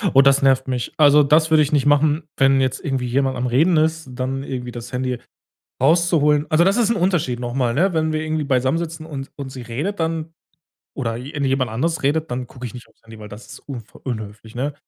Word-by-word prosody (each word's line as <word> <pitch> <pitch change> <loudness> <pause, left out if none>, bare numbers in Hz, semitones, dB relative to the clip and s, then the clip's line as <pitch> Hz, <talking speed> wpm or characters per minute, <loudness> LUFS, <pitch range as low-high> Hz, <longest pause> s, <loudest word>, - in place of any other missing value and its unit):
Oh, 135 - +9
das 140 0 +4
nervt 135 -1 +3
mich. 125 -2 -3
Also, 150 -1 +6
das 155 +3 +3
würde 155 -1 +5
ich 145 - -3
nicht 145 -2 +2
machen, 145 +2 +3
wenn 135 0 +4
jetzt 130 0 -1
irgendwie 135 -3 -2
jemand 130 +1 0
am 125 - -1
Reden 155 +8 +3
ist, 160 -2 0
dann 130 +2 -3
irgendwie 125 -3 -5
das 120 0 -8
Handy 125 -1 -2 0.6
rauszuholen. 155 -1 +3
Also, 155 +2 +4
das 195 +2 +3
ist 235 -2 +2
'n 230 - +1
Unterschied 170 -9 0
noch 120 0 -4
mal, 125 -3 +1
ne? 185 +6 +2
Wenn 160 -1 +1
wir 155 - -1
irgendwie 155 -1 -2
beisammen 130 +2 +1
sitzen 160 -1 -6
und 135 -4 -7
und 140 -2 -6
sie 130 -1 -8
redet 150 - -4
dann 160 0 -2 0.6
oder 115 -5 -2
je 125 +4 -7
irgendjemand 135 -4 0
anders 160 +9 -1
redet, 155 +2 0
dann 125 0 -3
gucke 125 0 -8
ich 120 - -9
nicht 125 - -11
auf's - - -31
Handy, 110 -1 -12
weil 105 - -10
das 105 +2 -11
ist 135 - -10
unfreu 120 -6 -10
unhöflich, 110 -2 -6
ne? 140 +4 -2
135 Hz, 230 wpm, -21 LUFS, 125-155 Hz, 0.6 s, Oh